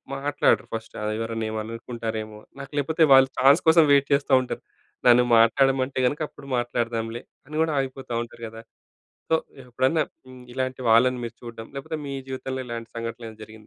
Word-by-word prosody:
మాట్లాడరు 145 +1 +1
ఫస్టు. 115 0 -6
ఆ - - -2
ఎవరైనా 115 0 -3
ఏమైననుకుంటారేమో! 110 -1 -5 0.2
నాకు 140 - -9
లేకపోతే 160 +3 +3
వాళ్ళు 135 0 +7
ఛాన్స్ 135 +2 +6
కోసం 160 0 +7
వెయిట్ 140 0 +4
చేస్తా 140 0 +1
ఉంటారు. - - -6 0.4
నన్ను 125 0 +6
మాట్లాడమంటే 130 +3 +3
గనక 145 +4 -3
అప్పుడు 140 -1 -14
మాట్లాడదాంలే, 115 -1 -2 0.3
అని 155 +1 -6
కూడా 160 -2 -1
ఆగిపోతా 130 -2 -5
ఉంటారు 115 0 -13
గదా! 110 +1 -11 0.7
సో 160 - +5 0.3
ఎప్పుడన్నా 130 +6 +1 0.2
హ్మ్ 130 -1 -12
ఇలాంటి 130 0 -3
వాళ్ళని 125 +2 +4
మీరు 115 0 -7
చూడడం 115 -1 -9
లేకపోతే 155 +3 -5
మీ 140 - -4
జీవితంలో 130 0 -4
ఇలాంటి 115 -1 -6
సంఘటనలేమైనా 115 -1 -7
జరిగిందా? 110 -1 -15
125 Hz, 160 wpm, -24 LUFS, 115-135 Hz, 0.7 s, వాళ్ళు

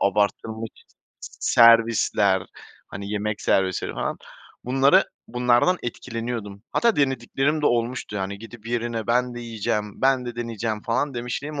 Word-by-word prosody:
abartılmış 105 +2 0 0.7
servisler, 115 -4 +4 0.4
hani, 100 +1 -7
yemek 105 0 -2
servisleri 95 -2 +1
falan. - - -3 0.5
Bunları 135 +2 +4 0.2
bunlardan 125 +8 +3
etkileniyordum. 115 -4 -5
Hatta 235 -1 +2
denediklerim 135 +2 0
de - - +4
olmuştu, 120 -3 -1
hani, 95 +1 -4
gidip 115 +1 -12
yerine 115 -1 -2
ben 125 +1 +1
de 120 - -6
yiyeceğim, 105 -3 -3
ben 130 -1 +3
de 120 -1 -6
deneyeceğim 115 -2 -3
falan 135 +4 -1
demişliğim 135 +5 -4
115 Hz, 125 wpm, -24 LUFS, 105-125 Hz, 0.7 s, servisler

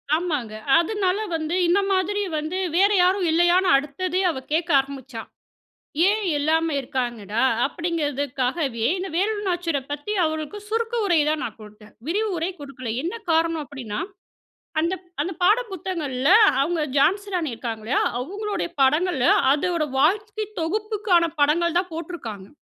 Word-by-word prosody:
ஆமாங்க. 295 -10 -2 0.3
அதனால 380 +1 0 0.2
வந்து 320 +2 -2
இந்த 370 +4 +4
மாதிரி 395 +2 0 0.2
வந்து 310 +5 -3 0.2
வேற 400 +2 +5
யாரும் 365 0 +2
இல்லையான்னு, 350 +3 +4
அடுத்ததே 360 +7 -2
அவ 265 - -5
கேட்க 340 +2 0
ஆரம்பிச்சா. 270 -4 -6 0.9
ஏன்? 425 +2 +2 0.2
எல்லாமே 320 +2 +1
இருக்காங்கடா 240 -4 -3 0.2
அப்படிங்கிறதுக்காகவே 285 -6 -2
இந்த 380 +1 -4
வேலுநாச்சியார 360 -6 0
பத்தி, 290 +9 -4
அவளுக்கு 315 +5 -3
சுருக்கு 455 +1 -1
உரை 345 -4 +3
தான் 305 -3 0
நான் 225 -1 -6
கொடுத்தேன். 210 0 -14
விரிவுரை 370 -2 -1
கொடுக்கல. 255 -4 -8
என்ன 350 +6 -3 0.2
காரணம் 325 -1 +1
அப்படின்னா, 245 -8 -6 0.8
அந்த 340 +4 0 0.3
அந்த 360 +5 -2
பாட 420 +6 +5
புத்தகங்கள்ல 310 -7 -2 0.3
அவங்க, 325 +2 0 0.2
ஜான்சி 395 +8 +2
ராணி 325 -7 -1
இருக்காங்க. 225 -1 -5
இல்லையா? 235 - +1 0.2
அவங்களுடைய 405 +10 -3
படங்களும், 295 0 +3
அதோட 335 +2 0 0.2
வாழ்க்கை 425 +6 +1
தொகுப்புக்கான 405 0 +1 0.2
படங்கள் 340 +4 +3
தான் 365 -2 -4
போட்டுருக்காங்க. 235 - -7
330 Hz, 125 wpm, -23 LUFS, 275-370 Hz, 0.9 s, வேற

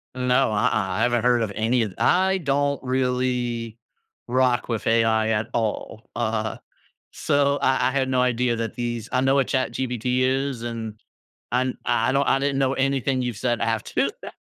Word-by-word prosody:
No, 125 -1 +2
uh-uh, 105 - +2
I 95 0 -1
haven’t 120 -1 +1
heard 120 -1 +3
of 105 - -3
any 115 +2 +1
of 100 -4 -5
I 190 +1 +3
don’t 140 -1 0
really 125 -3 -1 0.5
rock 125 -1 +1
with 115 -2 -2
AI 115 -1 +3
at 110 0 0
all. 110 -1 -3
Uh, 110 -2 -2 0.5
so 140 0 +1
I 130 0 +2
I - - -3
had 135 -1 0
no 130 -1 +2
idea 125 -1 +1
that 115 -2 -4
these 120 -2 -4
I 125 - +1
know 135 +1 +3
what 135 - +2
ChatGPT 130 -3 -2 0.4
is, 135 -4 -4
and 115 -1 -4 0.7
I'm 130 +1 +1 0.2
I 115 +3 +2
don’t 140 0 +2
I - - +3
didn’t 140 -1 0
know 135 +1 +1
anything 135 -1 -1
you’ve 120 -4 -3
said 120 -2 +1 0.2
after 110 - -2 0.2
that. - - -9
125 Hz, 175 wpm, -23 LUFS, 115-130 Hz, 0.7 s, heard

